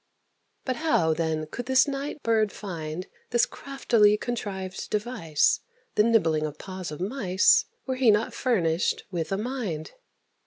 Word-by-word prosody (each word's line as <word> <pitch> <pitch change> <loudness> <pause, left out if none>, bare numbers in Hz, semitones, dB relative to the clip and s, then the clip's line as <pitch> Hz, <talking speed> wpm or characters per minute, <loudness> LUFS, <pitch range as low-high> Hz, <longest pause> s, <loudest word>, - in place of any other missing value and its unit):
But 255 -2 -1
how, 305 - +2
then, 160 -1 -1
could 245 +10 -7
this 260 +2 +5
night 280 +1 -4
bird 220 -2 +2
find 170 -3 -5 0.2
This 240 0 +3
craftily 235 -7 +2
contrived 195 -5 -4
device, 210 -9 +1 0.3
The - - +4
nibbling 165 -9 +3
of 150 - -9
the - - -12
paws 185 -2 -6
of 150 - -7
mice, 190 -2 +3 0.2
Were 260 -1 -2
he 255 -3 +4
not 210 +2 +3
furnished 180 -9 +1
with 170 -2 -3
a 195 - +1
mind? 210 - -4
205 Hz, 150 wpm, -26 LUFS, 165-245 Hz, 0.3 s, this